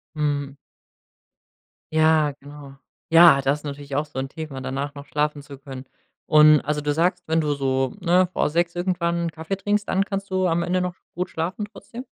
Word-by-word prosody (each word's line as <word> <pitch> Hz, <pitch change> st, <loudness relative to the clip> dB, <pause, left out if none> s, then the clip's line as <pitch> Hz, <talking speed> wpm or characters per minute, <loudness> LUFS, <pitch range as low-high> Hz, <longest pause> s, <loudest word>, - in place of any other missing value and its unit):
Mhm. 145 Hz, -2 st, -2 dB, 1.4 s
Ja, 155 Hz, -1 st, +4 dB
genau. 145 Hz, -1 st, -12 dB, 0.4 s
Ja, 165 Hz, -4 st, +8 dB
das 140 Hz, +2 st, 0 dB
natürlich 140 Hz, -1 st, -5 dB
auch 150 Hz, -, 0 dB
so 135 Hz, -, -12 dB
'n 135 Hz, 0 st, -3 dB
Thema, 155 Hz, -5 st, -7 dB
danach 140 Hz, +2 st, -4 dB
noch 140 Hz, 0 st, -9 dB
schlafen 150 Hz, 0 st, -1 dB
zu 140 Hz, -1 st, -11 dB
können. 135 Hz, -1 st, -9 dB, 0.4 s
Und 155 Hz, -1 st, +6 dB
also, 150 Hz, 0 st, -2 dB
du 145 Hz, 0 st, -1 dB
sagst, 180 Hz, +3 st, 0 dB
wenn 160 Hz, 0 st, +2 dB
du 150 Hz, -1 st, 0 dB
so, 135 Hz, -1 st, -1 dB
ne, 180 Hz, 0 st, +3 dB
vor -, -, 0 dB
6 170 Hz, +2 st, 0 dB
irgendwann 170 Hz, -1 st, -1 dB
'n 165 Hz, -, -3 dB
Kaffee 160 Hz, +5 st, -5 dB
trinkst, 205 Hz, +1 st, -1 dB
dann 195 Hz, +1 st, +1 dB
kannst 195 Hz, -1 st, -4 dB
du 185 Hz, -1 st, +1 dB
am 170 Hz, 0 st, +1 dB
Ende 185 Hz, +1 st, 0 dB
noch 180 Hz, 0 st, -3 dB, 0.2 s
gut 180 Hz, +1 st, -3 dB
schlafen 180 Hz, +6 st, -3 dB
trotzdem? 235 Hz, +4 st, -10 dB
155 Hz, 185 wpm, -23 LUFS, 145-175 Hz, 1.4 s, Ja